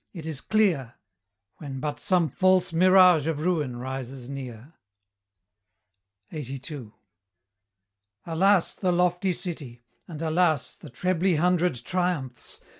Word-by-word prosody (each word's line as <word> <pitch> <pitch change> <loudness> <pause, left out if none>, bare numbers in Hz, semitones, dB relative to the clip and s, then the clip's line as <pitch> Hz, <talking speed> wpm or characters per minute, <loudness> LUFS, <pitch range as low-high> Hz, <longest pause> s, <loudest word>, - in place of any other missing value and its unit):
it 165 -5 -8
is 155 -4 -4
clear 175 - +1 0.6
When 135 -4 -7
but 150 +1 -4
some 180 -5 +2
false 185 0 +2
mirage 180 -3 +6
of 155 -2 -2
ruin 150 -9 0
rises 130 0 -6
near. 130 0 -8 1.6
LXXXII. 135 -4 -7 1.3
Alas, 180 +3 +2
the 185 -2 -1
lofty 180 +1 +1
city! 155 -9 -6 0.3
and 160 -4 -8
alas 160 -3 +1
The - - -13
trebly 180 +6 0
hundred 180 0 +2
triumphs! 175 -9 -3
160 Hz, 110 wpm, -26 LUFS, 135-180 Hz, 1.6 s, mirage